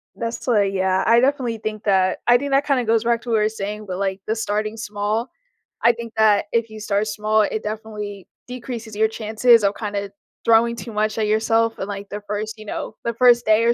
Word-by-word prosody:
That's 230 0 -5
why 220 -5 +4
Yeah, 190 -1 +1
I 230 +1 +5
definitely 255 -3 +1
think 215 0 -5
that 190 -2 +2
I 240 0 +7
think 280 +2 -4
that 275 +1 +3
kinda 270 -3 +1
goes 225 0 +2
back 235 0 +1
to 240 - -9
what 230 - +2
you - - +2
were 215 - +2
saying, 210 -1 -5
about, 185 -3 -5
like, 195 -1 -1
the 220 - 0
starting 215 -1 -2
small. 215 +2 -2 0.5
I 235 - +7
think 230 -1 -8
that 215 -2 +4
if 230 -1 0
you 220 0 -10
start 205 0 0
small, 215 +1 +1
it 215 +1 -2
definitely 210 -2 -6 0.2
decreases 235 -3 -7
your 220 +1 +3
chances 220 +1 +3
of 200 0 +2
kinda 205 -2 -4 0.3
throwing 230 +1 +4
too 235 - -8
much 215 +1 0
at 215 -1 0
yourself 225 +1 +1
in, 190 - -3
like, 200 -1 -6
the 205 +1 -6
first 215 +2 -4
you 215 - -10
know, 215 - -5
the 235 - 0
first 240 0 +4
day 215 +1 +4
or 235 - +4
220 Hz, 225 wpm, -21 LUFS, 210-230 Hz, 0.5 s, I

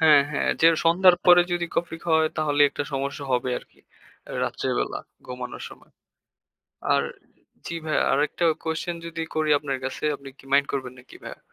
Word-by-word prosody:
হ্যাঁ, 150 -3 +7
হ্যাঁ, 150 - 0
যে 165 - +8 0.2
সন্ধ্যার 175 +2 +6
পরে 175 0 +8
যদি 175 -1 0
কফি 165 -1 -1
খাওয়ায় 160 -1 +3
তাহলে 145 -2 0
একটা 145 - -4
সমস্যা 140 +1 -3
হবে 125 0 0
আরকি। - - -22 0.6
রাত্রে - - -2
বেলা - - -2 0.3
ঘুমানোর 125 0 -7
সময়। - - -17 1.0
আর - - +3 0.6
জি - - -4
ভাইয়া। 155 - +1
আরেকটা 150 +5 0 0.2
কোয়েশ্চেন 165 +1 -3
যদি 165 0 -5
করি 155 -1 +1
আপনার 140 -3 -3
কাছে 135 - -5
আপনি 140 0 -11
কি - - -18
মাইন্ড 140 0 +4
করবেন 130 -2 -3
নাকি 125 - -16
ভাইয়া? - - -9
155 Hz, 165 wpm, -25 LUFS, 140-165 Hz, 1.0 s, যে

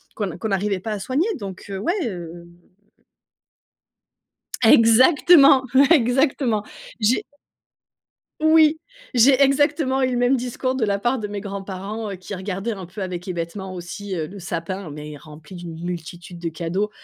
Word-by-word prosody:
qu'on 205 -3 -2
n'a 170 - -7
qu'on 220 - -4
n'arrivait 195 -1 -1
pas 220 +3 -5
à 210 - -3
soigner. 275 - 0
Donc, 195 -5 -8
heu, 195 -1 -4
ouais, 340 - 0
hem. 175 -5 -6 2.2
Exactement, 260 +5 +6 0.3
exactement. 250 -4 +2 0.4
J'ai 225 +4 +1 1.1
oui, 315 0 +4 0.3
j'ai 255 +3 +5
exactement 275 -1 +2
eu 260 - +2
le 245 - -1
même 245 +2 +3
discours 255 +1 -2
de 260 -3 -2
la 200 -1 +1
part 240 +4 0
de 210 - -4
mes 205 -1 -5
grands-parents 200 +1 -6
qui 185 +2 -9
regardaient 195 +4 -4
un 190 -5 -7
peu 190 +2 -6
avec 180 0 -6
hébétement 185 +2 -5
aussi, 185 +2 -6
heu, 160 -2 -2
le 195 +5 -10
sapin, 175 +1 -5
mais 150 0 -8
rempli 150 +3 -13
d'une 170 -2 -8
multitude 175 0 -7
de 170 -1 -3
cadeaux. 175 +6 -2
200 Hz, 150 wpm, -22 LUFS, 180-250 Hz, 2.2 s, Exactement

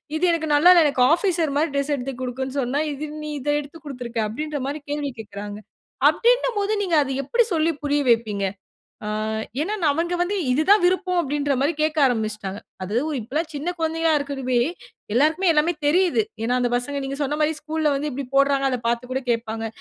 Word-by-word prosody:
இது 315 - -2
எனக்கு 320 -1 -1
நல்லால, 345 +5 +7
எனக்கு 280 -3 +1
ஆஃபீசர் 340 -4 +1
மாரி 315 +3 +2
டிரெஸ் 280 +1 0
எடுத்து 270 0 -4
குடுக்குனு 260 +2 -4
சொன்னா 260 +4 -1
இது 300 +2 -5 0.2
நீ 305 - -5
இத 290 - -3
எடுத்து 295 +3 -9
குடுத்துருக்கா. 245 -5 -4
அப்டின்ற 300 +6 -4
மாரி 290 +2 -3
கேள்வி 290 -2 -2
கேட்கறாங்க. 205 -1 -7 0.5
அப்டின்னும் - - +2
போது, 405 +1 0
நீங்க 355 -4 +1
அத 270 - -5
எப்டி 470 - +2
சொல்லி 320 +1 +2
புரிய 290 0 +1
வைப்பீங்க? 220 -4 +2 0.6
ஆ - - -4 0.5
ஏனா, 410 +7 -1 0.2
அவங்க 335 +4 -1
வந்து 365 +4 0 0.2
இது 285 +5 +2
தான் 410 -1 +7
விருப்பம் 365 0 +1
அப்டின்ற 290 -1 -1
மாரி 295 +4 +2
கேட்க 310 0 0
ஆரம்மிச்சிட்டாங்க. 215 -4 -3 0.2
அதுவும் 245 +11 -1
இப்பல்லாம் 300 +9 -3
சின்ன 295 +5 -2
குழந்தையா 325 0 +1
இருக்கதுவே, 270 -3 -1 0.5
எல்லோருக்குமே 315 +8 +3
எல்லாமே 310 +3 +2
தெரியிது. 360 +6 +3 0.2
ஏனா 245 +2 +1
அந்த 245 - +1
பசங்க 280 +4 -2
நீங்க 275 +1 -4
சொன்ன 290 +2 -2
மாரி 305 +1 +2
ஸ்கூல்‌ல 305 -1 0
வந்து 290 +2 -2
இப்டி 275 +2 -4
போடுறாங்க. 275 0 +3
அத 250 - -1
பார்த்து 240 +2 -1
கூட 265 - -1
கேட்பாங்க. 225 -1 -2
285 Hz, 180 wpm, -23 LUFS, 250-320 Hz, 0.6 s, நல்லால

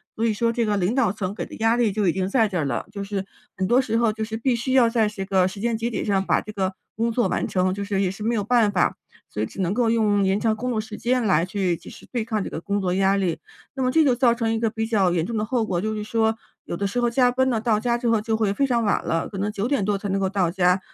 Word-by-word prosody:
所 225 - -3
以 220 - +2
说 230 +2 0
这 235 -1 0
个 205 -1 0
领 195 +7 0
导 250 -8 +2
层 200 -1 -4
给 - - -4
的 - - -10
压 225 +1 +3
力 235 -4 +2
就 205 -1 0
已 170 - +3
经 190 0 -1
在 225 -1 +3
这 185 -3 -3
儿 155 - 0
了， 120 -4 -2
就 200 -1 -4
是 195 -1 -3 0.3
很 190 0 0
多 250 +4 +4
时 225 -3 -1
候 230 -2 +2
就 220 0 -4
是 220 0 -4
必 240 +1 +1
须 240 +3 -3
要 250 -3 +5
在 225 -3 +2
这 195 -3 -5
个 190 -2 +2
时 195 - -9
间 230 +1 0
节 230 +1 -2
点 225 - -3
上 195 -2 +1
把 - - +2
这 215 - -9
个 190 -1 -1 0.2
工 230 +2 0
作 240 +1 +1
完 - - -1
成， 185 0 0
就 200 +1 -4
是 200 -1 -1
也 185 - +1
是 210 +2 -8
没 230 +1 +1
有 205 - 0
办 230 -1 +3
法， 180 -3 +1 0.3
所 105 - -4
以 - - +1
只 195 - -6
能 185 +2 0
够 235 -1 +1
用 210 -3 +2
延 190 +1 +2
长 225 -1 +1
工 250 +3 -3
作 220 - -1
时 215 0 -9
间 250 0 0
来 185 -4 +3
去 185 -3 -1
及 - - -13
时 - - -13
对 235 -3 -2
抗 215 -4 -1
这 - - -5
个 - - -5
工 200 +3 -2
作 180 -1 0
压 195 +1 +3
力。 185 -4 -1 0.4
那 265 - -3
么 255 - +2
这 320 +2 +4
就 265 -4 +4
造 240 -1 +3
成 225 -1 0
一 225 - -1
个 225 -1 +1
比 225 0 -3
较 200 -6 +2
严 170 -1 0
重 230 -1 -3
的 215 - 0
后 235 -1 0
果， 175 -4 -1
就 215 +1 -2
是 210 - -4
说 220 0 0 0.3
有 - - -4
的 200 - -2
时 245 +5 -2
候 240 - +2
加 245 +1 +3
班 260 +1 +1
了， 230 -3 +1
到 220 -3 +2
家 240 +1 0
之 240 -1 -3
后 225 -2 +3
就 220 0 -1
会 205 -3 +1
非 275 - +1
常 235 -2 +1
晚 205 - +1
了， 165 0 -1
可 195 - -7
能 205 +1 0
9 210 +2 -2
点 275 -7 +1
多 205 -1 +1
才 205 - -5
能 195 +1 0
够 190 - +1
到 190 -4 +1
家， 180 +1 +2
215 Hz, 345 characters per minute, -23 LUFS, 195-235 Hz, 0.4 s, 要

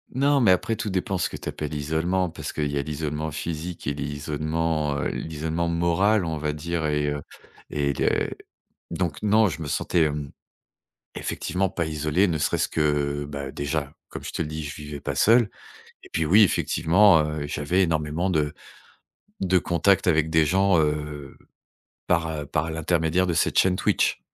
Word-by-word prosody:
Non, 140 0 +3
mais 110 - +4
après 115 +5 +1
tout 105 - -3
dépend 95 0 -1
ce - - 0
que - - -7
tu - - -6
appelles 75 0 -5
isolement 80 +4 0
parce - - -6
qu'il 75 -1 -2
y 70 - -1
a - - +1
l'isolement 75 +1 -3
physique 80 +3 -5
et 70 - 0
l'isolement, 75 +1 -2
heu, - - -1
l'isolement 80 +2 -3
moral, 85 +4 +2
on 80 -1 -2
va 75 0 -1
dire 80 +1 -2
et 75 0 0
heu 75 0 -3 0.5
et 70 -1 0
le - - +1 0.6
donc 85 -3 -2
non, 105 0 +4
je 80 +1 -6
me 75 - -4
sentais, 80 +3 +1
hem, 75 -2 -3 0.8
effectivement 95 0 -2
pas 85 -2 -2
isolé. 80 +5 +1
Ne 80 - 0
serait-ce - - 0
que, 75 -2 0
bah, 70 -1 -5
déjà, 70 0 -3 0.2
comme - - -7
je - - -4
te - - -1
le 75 - -5
dis, 80 0 -5
je 75 - -5
vivais 75 -1 -7
pas 70 -1 -3
seul 115 - +5 0.5
et - - -14
puis, 80 - 0
oui, 100 +8 +6
effectivement, 85 +1 +4
heu, 75 -1 -3
j'avais 80 +7 0
énormément 80 +2 0
de 75 -3 0 0.9
de 95 -1 +3
contact 90 +3 +2
avec 80 -2 +3
des 80 -1 +4
gens, 95 +1 +3
heu, 75 -2 -2 0.7
par, 85 -2 +2
heu, 75 -2 -4
par 75 +3 -1
l'intermédiaire 80 +2 +1
de 85 - +1
cette - - +1
chaîne 90 -1 +4
Twitch. - - +1
80 Hz, 180 wpm, -25 LUFS, 75-90 Hz, 0.9 s, oui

